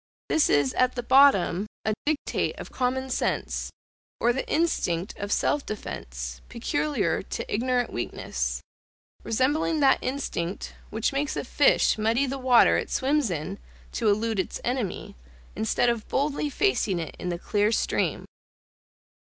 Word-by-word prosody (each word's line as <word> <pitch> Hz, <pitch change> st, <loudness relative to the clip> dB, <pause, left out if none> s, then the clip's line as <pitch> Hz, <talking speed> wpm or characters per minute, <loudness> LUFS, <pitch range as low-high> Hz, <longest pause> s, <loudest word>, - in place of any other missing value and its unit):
This 320 Hz, -, +3 dB
is 145 Hz, -2 st, +3 dB
at 255 Hz, 0 st, +2 dB
the 245 Hz, -, -3 dB
bottom, 235 Hz, -8 st, +5 dB, 0.2 s
a 215 Hz, -, +2 dB
dictate 305 Hz, -1 st, -1 dB
of -, -, -8 dB
common 260 Hz, +1 st, -1 dB
sense, -, -, -1 dB, 0.5 s
or 240 Hz, +1 st, +3 dB
the 265 Hz, -, -4 dB
instinct 200 Hz, -, 0 dB
of 205 Hz, 0 st, -4 dB
self 290 Hz, -, +1 dB
defence, 60 Hz, -, -6 dB
peculiar 290 Hz, +5 st, -1 dB
to -, -, -5 dB
ignorant 245 Hz, +2 st, 0 dB
weakness; -, -, -3 dB, 0.6 s
resembling 290 Hz, +7 st, +1 dB
that 275 Hz, -, +5 dB
instinct, 205 Hz, -9 st, -3 dB, 0.2 s
which 220 Hz, +5 st, -1 dB
makes 280 Hz, +1 st, -1 dB
a -, -, -2 dB
fish -, -, +3 dB
muddy 230 Hz, +5 st, +2 dB
the 270 Hz, +1 st, -4 dB
water 255 Hz, -2 st, +5 dB
it -, -, -3 dB
swims 280 Hz, -2 st, +1 dB
in 175 Hz, +4 st, -4 dB, 0.3 s
to 225 Hz, -3 st, +1 dB
elude 215 Hz, +1 st, +1 dB
its 185 Hz, -, -2 dB
enemy, 245 Hz, -6 st, -3 dB, 0.4 s
instead 110 Hz, -, +1 dB
of 235 Hz, -2 st, 0 dB
boldly 290 Hz, +1 st, 0 dB
facing 275 Hz, -, +1 dB
it 165 Hz, -2 st, -5 dB
in 180 Hz, -, -3 dB
the 175 Hz, -, -2 dB
clear 205 Hz, +4 st, +1 dB
stream. -, -, 0 dB
235 Hz, 145 wpm, -26 LUFS, 190-270 Hz, 0.6 s, bottom